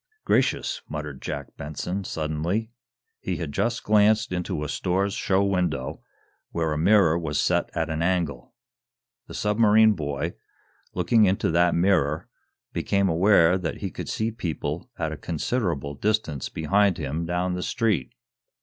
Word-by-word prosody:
"Gracious!" 130 - +1
muttered 75 -3 -6
Jack - - -6
Benson, 90 +6 -4
suddenly. 85 +8 -2 0.5
He 90 -2 -3
had 80 -4 -4
just 115 +8 -1
glanced 110 +1 +3
into 90 -4 -2
a - - -3
store's 95 +6 0
show 95 +1 +1
window, 90 -9 -1 0.5
where 80 -2 -1
a - - -2
mirror 85 -2 +4
was 75 -3 -2
set - - +1
at - - -1
an 80 +1 -2
angle. 85 - -1 0.7
The - - -9
submarine 110 +1 +4
boy, 75 -6 -3 0.6
looking 105 +5 +4
into 95 -3 +1
that 85 +1 +3
mirror, 85 -5 +2 0.5
became 100 -1 +1
aware 90 0 +4
that 85 -3 -3
he - - -3
could - - -6
see 110 +1 -1
people 85 -5 -4
at 80 -2 -2
a 80 - -5
considerable 80 - -2
distance 90 -4 -1
behind 100 +4 +2
him 80 +3 -3
down 90 +1 -1
the 90 - -3
street. 100 - -1
90 Hz, 145 wpm, -25 LUFS, 80-100 Hz, 0.7 s, mirror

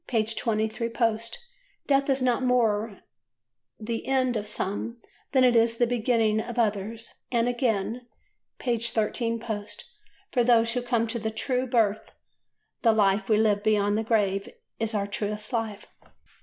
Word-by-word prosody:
23 220 0 0
post), 230 -1 -1 0.5
"Death 275 0 +2
is 265 -1 +2
not 250 0 +2
more 225 -5 +1 0.8
the 225 +1 -4
end 260 -2 +1
of 210 -1 -3
some 210 +3 -3 0.3
than 260 -2 +4
it 245 -1 +5
is 230 0 +3
the 240 - +3
beginning 230 -2 +1
of 240 +1 -7
others"; 220 0 -1 0.2
and, 235 -1 +2
again 240 -1 -1 0.5
(p. 240 -3 -1
13 230 +1 0
post), 215 -3 -6 0.5
for 245 - +2
those 230 -1 +4
who 250 - -1
come 240 -2 0
to 230 +1 -3
the 220 0 -2
true 250 +3 -1
birth 220 -4 0 0.7
the 225 -2 +4
life 200 -1 +2
we 215 - +4
live 210 -2 +2
beyond 205 -1 +2
the 220 - 0
grave 200 -3 0 0.3
is 225 0 -1
our 200 -1 0
truest 210 +2 -3
life. 220 -3 -2
225 Hz, 150 wpm, -26 LUFS, 215-240 Hz, 0.8 s, it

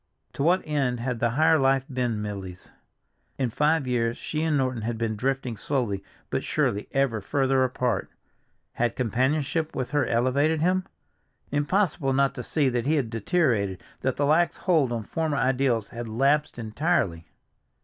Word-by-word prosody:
To - - -5
what 175 +5 +3
end 135 -5 0
had 125 -1 -2
the 120 - +2
higher 160 +6 +4
life 135 0 +3
been 125 -6 -2
Milly's? 95 -3 -7 0.7
In 130 -4 -1
five 150 +3 +2
years 120 -2 0
she 155 - -3
and 160 -2 +1
Norton 130 -3 0
had 115 +1 -3
been 110 -1 -1
drifting 130 +1 -1
slowly 110 -6 -2 0.3
but - - -1
surely 100 +1 0
ever 135 -6 +1
further 135 +3 +1
apart. 125 -4 -1 0.6
Had 120 -1 0
companionship 140 +6 0
with 130 - -3
her 145 0 +1
elevated 140 +7 +2
him? 185 +3 +1 0.6
Impossible 145 -1 +1
not 135 0 +2
to - - -5
see 145 +3 0
that 125 0 -1
he 155 - +3
had 130 -7 -1
deteriorated, 115 - 0 0.2
that 130 -1 -1
the 145 - +1
lax 160 +4 +3
hold 160 -9 +2
on 115 -2 -2
former 155 +5 -2
ideals 125 -5 +1
had 120 -1 -6
lapsed 140 +7 +1
entirely! 110 - -1
130 Hz, 160 wpm, -26 LUFS, 115-150 Hz, 0.7 s, higher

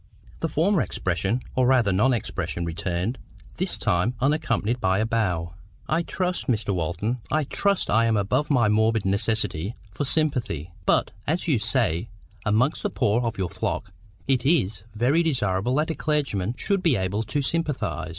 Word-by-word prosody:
The 165 - -1
former 170 +5 +2
expression, 95 +7 -1
or 130 -1 +3
rather 125 -6 +4
non 105 +8 +3
expression, 95 -6 -2
returned; 90 +7 -2 0.4
this - - +1
time 90 +8 +1
unaccompanied 135 -4 0
by 95 0 +2
a 110 - +1
bow. 90 -8 -1 0.3
"I 160 +2 +1
trust, 180 +1 -2
Mr. 110 -4 0
Walton, 90 +8 -2
I 155 +3 +1
TRUST 200 +7 +1
I 115 +1 +4
am 110 -1 +2
above 125 +9 +1
any 125 -6 +4
morbid 110 0 +2
necessity 100 -2 0 0.2
for 100 - -3
sympathy. 125 - 0 0.2
But, - - +3 0.2
as 165 +5 0
you 140 -8 +3
say, 115 - +1 0.4
amongst 120 +8 +2
the - - -1
poor 105 +4 +1
of 115 -2 -2
your 95 -3 -1
flock,—it 115 +5 -3
IS 110 - +1
very 130 +9 +3
desirable 120 - 0
that 155 +3 +1
a - - -1
clergyman 130 -10 -1
should 200 -3 0
be 165 -7 +3
able 95 +2 -1
to 115 +6 -2
sympathise." 130 - -1
115 Hz, 160 wpm, -25 LUFS, 100-145 Hz, 0.4 s, rather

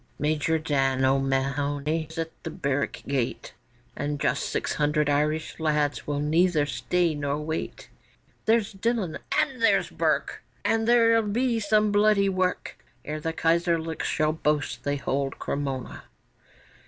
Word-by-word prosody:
Major 155 +1 +1
Dan 135 -4 +1
O'Mahony 140 +3 0
is 160 - -11
at 165 0 -2
the - - -5
barrack 140 0 -2
gate, 130 -4 -2 0.4
And 145 0 -3
just - - 0
six - - -1
hundred 150 0 +1
Irish 150 +3 0
lads 150 -2 0
will 145 -1 -1
neither 160 +1 +2
stay 175 +2 0
nor 145 -1 -2
wait; 160 +1 -4 0.6
There's 225 -2 +2
Dillon 205 -4 -1 0.2
and 260 -3 0
there's 215 -3 +3
Burke, - - 0 0.2
And 225 0 +1
there'll 230 -1 +5
be 230 +3 0
some 215 0 +2
bloody 205 -1 +4
work 185 -1 -1 0.3
Ere 155 +1 -4
the 165 +2 -2
Kaiserlics 165 0 0
shall 155 0 +1
boast 150 -2 -1
they 145 0 +1
hold 140 0 -2
Cremona. 135 -3 -4
155 Hz, 135 wpm, -26 LUFS, 145-190 Hz, 0.6 s, there'll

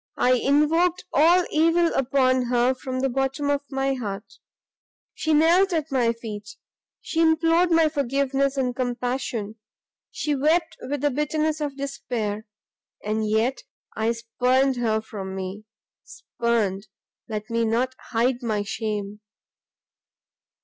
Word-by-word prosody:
I 250 - +3
invoked 320 +8 +2
all 345 +4 +5
evil 330 +2 +3
upon 255 -1 +2
her 245 +1 +2
from 255 0 -4
the 270 - +2
bottom 270 +3 -1
of 285 -1 0
my 270 0 0
heart 205 -5 -6 0.7
She 315 - -2
knelt 340 +5 +4
at 315 -2 -1
my 245 -3 +2
feet, 210 -3 -8 0.5
she 325 - -1
implored 330 +2 +3
my 330 -1 +4
forgiveness 275 -1 0
and 250 -2 0
compassion, 245 -3 -3 0.5
she 300 - -2
wept 315 +4 +1
with 285 +1 -4
the 290 0 +2
bitterness 305 +2 -1
of 285 -2 -3
despair, 235 -6 -4 0.6
and 215 0 -1
yet 225 +5 +1 0.4
I 220 +1 +1
spurned 250 +3 +1
her 220 -2 0
from 195 -3 -7
me! 190 +3 -6 0.4
Spurned? 215 -4 -2 0.4
let 215 0 -5
me 230 0 +1
not 235 +3 0 0.2
hide 245 +2 +1
my 215 -4 -1
shame! 210 -1 -4
255 Hz, 130 wpm, -24 LUFS, 225-295 Hz, 0.7 s, all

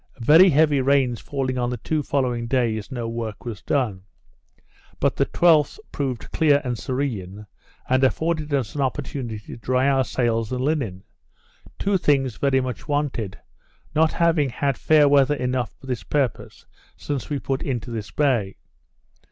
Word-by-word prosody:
Very 165 +9 +7
heavy 150 -2 +3
rains 130 -3 +2
falling 130 -2 -3
on 120 0 0
the 125 - -3
two 155 +6 -1
following 125 -5 -1
days, 115 -2 -1
no 120 -3 -3
work 115 0 -5
was 115 -3 -6
done; 120 -10 -1 1.0
but - - +1
the - - +1
12th 165 - +3
proved 130 -5 -4
clear 145 -3 +4
and 125 -2 -2
serene, 110 -6 -4 0.4
and 130 +1 +2
afforded 155 +3 0
us 130 -6 -1
an 145 - -2
opportunity 130 -3 -3
to 105 - -10
dry 130 +3 +1
our 135 -1 +3
sails 115 -3 -1
and 125 0 -2
linen; 130 - -1 0.7
two 195 -1 +1
things 135 -7 +1
very 135 -1 +2
much 130 -1 -5
wanted; 140 -9 -2 0.6
not 155 +1 +3
having 165 -5 +2
had 135 +2 -1
fair 150 +1 +4
weather 140 0 +4
enough 125 -3 -2
for - - -14
this 125 -5 -3
purpose 135 +4 -2 0.3
since 140 -4 -4
we 145 - -1
put 135 0 -3
into 120 -3 -3
this 110 -3 -5
bay. 120 -10 0
130 Hz, 160 wpm, -23 LUFS, 120-145 Hz, 1.0 s, Very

